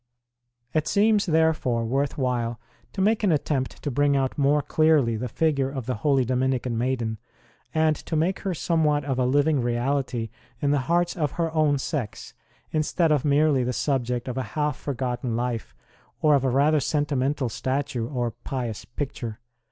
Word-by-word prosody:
It 155 -1 +1
seems, 210 0 +3
therefore, 155 -8 +2
worth 135 +5 -1
while 120 -4 -1 0.3
to 190 - -2
make 215 +3 +2
an 200 - +4
attempt 140 -3 -1
to 145 - -1
bring 145 +2 +2
out 135 -1 0
more 145 +1 +2
clearly 150 -6 +3
the 120 +3 -3
figure 140 -1 +1
of 135 -4 -5
the 130 - -1
holy 135 +3 +2
Dominican 130 -1 0
maiden, 115 -2 -1 0.5
and 155 -1 +2
to 160 - -5
make 170 +5 +1
her 190 -3 -2
some 165 0 +1
what 150 -2 +2
of 135 -2 -1
a 125 - +2
living 145 +1 +3
reality 120 -1 -1 0.3
in 145 -1 +1
the 145 - +3
hearts 175 0 +2
of 150 -5 -1
her 165 -2 -1
own 155 -3 +3
sex, 135 -5 -4 0.4
instead 155 +2 +1
of 150 -4 +2
merely 145 -2 +3
the 125 +1 -1
subject 125 -3 -1
of 130 +1 -3
a 115 -2 -6
half 150 -2 +1
for 140 0 -5
gotten 125 -1 -2
Life, 120 - -3 0.4
or 150 -1 +4
of 140 -2 +3
a 135 - +2
rather 145 +4 +3
sentimental 145 -1 0
statue 130 0 -2
or 120 -4 -1
pious 120 -2 -5
picture. 120 -4 -5
140 Hz, 175 wpm, -25 LUFS, 125-155 Hz, 0.5 s, an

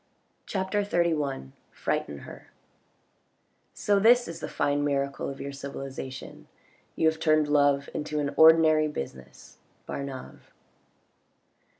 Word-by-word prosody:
CHAPTER 190 +1 -1
LXI 155 - -1 0.2
FRIGHTEN 70 - -2
HER - - -12 1.3
So 205 -1 +2
this 240 +4 +5
is 165 0 -7
the - - -5
fine 145 0 0
miracle 140 -1 -1
of 135 - -8
your 140 - -5
civilisation; 135 -1 -8 0.5
you 160 - +2
have, 160 0 +1
turned 155 -1 +3
love 145 -1 +3
into 150 0 -3
an 140 -1 -2
ordinary 160 -1 +6
business. 65 - -8
— - - -38
Bat 140 - -4
nave. 135 -2 -10
145 Hz, 120 wpm, -27 LUFS, 140-160 Hz, 1.3 s, ordinary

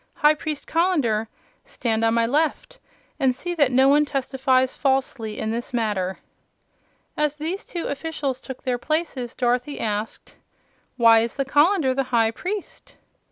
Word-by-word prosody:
High 300 0 +5
Priest 305 -1 -5
Colender, 290 -11 +1 0.4
stand 225 -2 -2
on 225 0 +3
my 230 0 +3
left 315 - -1 0.4
and 260 -3 +2
see 350 +6 -4
that 285 -6 +2
no 260 +2 +5
one 290 +2 +5
testifies 260 -2 0
falsely 265 -5 -1
in 220 - -2
this 240 +2 -4
matter." 200 -5 -1 1.0
As 300 0 0
these 330 +6 -3
two 345 - -5
officials 285 -3 -3
took 265 -2 -9
their 250 -1 -1
places, 300 -5 -2
Dorothy 250 +3 0
asked: 210 0 -4 0.6
"Why 230 -2 +7
is 230 +1 -2
the 275 - -1
colander 295 0 +3
the 270 +1 -1
High 225 -2 +3
Priest?" 385 - -6
265 Hz, 150 wpm, -23 LUFS, 235-300 Hz, 1.0 s, Why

